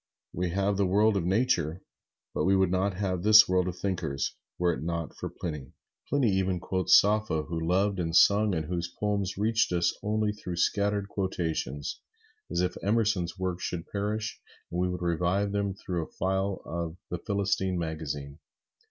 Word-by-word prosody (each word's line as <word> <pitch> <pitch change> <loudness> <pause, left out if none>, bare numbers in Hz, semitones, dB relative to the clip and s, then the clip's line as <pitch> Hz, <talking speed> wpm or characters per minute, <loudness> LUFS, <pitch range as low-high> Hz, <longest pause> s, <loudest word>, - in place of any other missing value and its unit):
We 90 +1 -1
have 100 +2 0
the 100 -1 +2
world 105 +3 +3
of 90 -3 0
Nature, 95 -5 +1 0.5
but - - 0
we 95 +1 +4
would 95 -2 +3
not 95 +1 +1
have 95 -2 -1
this 110 +2 +8
world 90 0 +2
of 90 -1 -4
thinkers, 85 -8 -2 0.2
were 90 -1 +2
it 65 - -6
not 85 0 -3
for - - -5
Pliny. 75 -6 -6 0.4
Pliny 135 -7 +2
even 95 -1 +1
quotes 95 +1 +5
Sappho, 105 -6 +1
who 85 +2 -4
loved 95 +4 +1
and 80 -1 -1
sung, 105 0 +5
and 80 -1 -2
whose 85 0 -2
poems 100 -2 -1
reached 110 +1 +2
us 85 -1 +1
only 105 0 0
through 90 -4 -6
scattered 100 +3 +1
quotations, 80 -8 -3 0.5
as 85 +2 0
if 90 - -1
Emerson's 100 -4 +1
works 95 -1 -3
should 85 -1 -3
perish 105 +2 -3 0.3
and 85 - -2
we 90 0 +1
would 90 -1 -4
revive 90 +4 0
him 100 -1 -1
through 85 -4 -3
a - - -26
file 95 +1 -1
of 85 0 -4
"The 90 - -2
Philistine" 100 -2 0
magazine. 75 -3 -4
95 Hz, 175 wpm, -28 LUFS, 85-100 Hz, 0.5 s, this